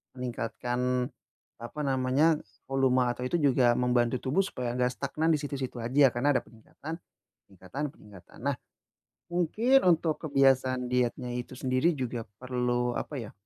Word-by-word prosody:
meningkatkan, 125 0 -2 0.5
apa 120 +6 -8
namanya, 135 +4 +2 0.3
volume 130 -2 +3
atau 125 +1 -6
itu 130 - -1
juga 130 -4 +4
membantu 125 0 +2
tubuh 135 +7 +1
supaya 125 -10 -3
nggak 125 0 +3
stagnan 155 +5 -1
di 150 - +1
situ-situ 140 -3 -4
aja 135 +4 +5
karena 140 +4 +2
ada - - +4
peningkatan 135 +7 -9 0.5
peningkatan 95 +8 -7
peningkatan. 100 -4 -16
Nah, 140 -1 +1 0.7
mungkin 215 +10 +3
untuk 165 -2 +1
kebiasaan 135 -3 +3
dietnya 125 0 0
itu 125 +1 -5
sendiri 130 +7 +2
juga 120 -3 -3 0.2
perlu, 125 -1 0
apa 145 - -4
ya, 115 -4 -7
130 Hz, 140 wpm, -29 LUFS, 125-140 Hz, 0.7 s, aja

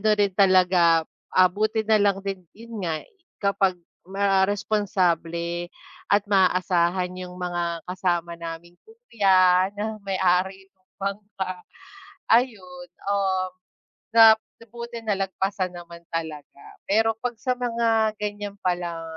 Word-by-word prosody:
ano 215 - +1
rin 200 -2 +2
talaga, 180 -4 +4 0.3
ah, 185 -1 +7
buti 215 +2 0
na 215 0 +3
lang 200 -1 +2
din, 195 -2 -4
'yun 230 -1 -9
nga 165 -4 -2
i - - -27 0.3
kapag 195 -2 +2 0.3
ma 195 +1 +2
responsable 180 -5 -1 0.5
at 205 - +5
maaasahan 185 -2 +2
'yung 180 -1 -7
mga 175 -1 -2
kasama 175 -2 -1
naming 170 +1 -8
kuya 195 - +2
na 215 +1 -4
may-ari 190 0 0
nung 185 0 -43
bangka 195 -2 -5 0.6
ayun, 190 -7 0 0.2
um, 190 -2 0 0.6
na 225 -1 +8 0.3
buti 235 0 -7
nalagpasan 195 -2 -2
naman 170 -1 -11
talaga. 155 -3 -6 0.2
Pero 225 +2 +2
'pag 245 +1 -3
sa 255 +2 0
mga 230 -3 +1
ganyan 205 -1 -4
palang 175 -2 -2
190 Hz, 120 wpm, -24 LUFS, 180-210 Hz, 0.6 s, na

